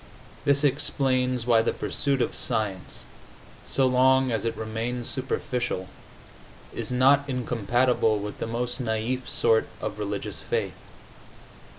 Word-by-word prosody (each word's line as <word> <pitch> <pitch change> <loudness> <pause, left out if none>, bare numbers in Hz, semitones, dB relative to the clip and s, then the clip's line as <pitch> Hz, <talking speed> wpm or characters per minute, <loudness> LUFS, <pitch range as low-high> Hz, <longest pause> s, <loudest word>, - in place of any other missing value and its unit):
This 140 0 +3
explains 130 -3 +1
why 115 -2 +5
the 115 - 0
pursuit 140 -3 0
of - - -3
science, 105 -6 -3 0.6
so 135 - +2
long 130 0 +4
as 115 -1 -1
it 115 - -1
remains 115 +2 -3
superficial, 125 -7 -2 0.8
is - - -3
not 135 +3 +5
incompatible 120 -2 +1
with 105 0 -6
the - - -2
most 120 +2 -3
naif 120 +3 -1
sort 115 -1 +3
of 105 -1 -4
religious 105 -1 -3
faith. - - -1
120 Hz, 120 wpm, -26 LUFS, 110-130 Hz, 0.8 s, why